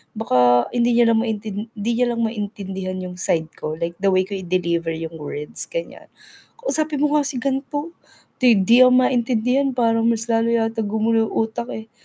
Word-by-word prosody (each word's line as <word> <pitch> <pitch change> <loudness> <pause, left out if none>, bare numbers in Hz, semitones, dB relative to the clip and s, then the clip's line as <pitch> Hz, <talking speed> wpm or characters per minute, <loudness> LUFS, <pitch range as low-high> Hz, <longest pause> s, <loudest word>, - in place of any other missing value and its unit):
Baka 125 - +3
hindi 240 -1 +1
niya 235 -1 +4
lang 225 - +3
maintin 215 -1 -4
hindi 215 +2 -2
niya 240 -1 +1
lang 230 - -2
maintindihan 200 -4 -4
'yong 180 0 -8
side 160 -2 -1
ko 155 0 -4
like 170 +1 -4
the 195 - 0
way 185 0 +3
ko 195 0 -6
i-deliver 170 -2 -1
'yong 160 0 -7
words, 150 0 -2
ganyan. - - -7 0.5
"Kausapin 310 - +1
mo 295 - +2
nga 285 - 0
si 280 - -3
ganto 275 +4 -3 0.5
'di 235 -6 +4
'di 240 +6 +6
ako - - +3
maintindihan 250 +1 +2
parang 230 -2 +2
mas 230 -1 +1
lalo 225 0 +2
yata 225 0 0
gumulo 220 +1 +1
utak 225 +2 -2
eh, 220 0 -10
225 Hz, 180 wpm, -21 LUFS, 185-245 Hz, 0.5 s, di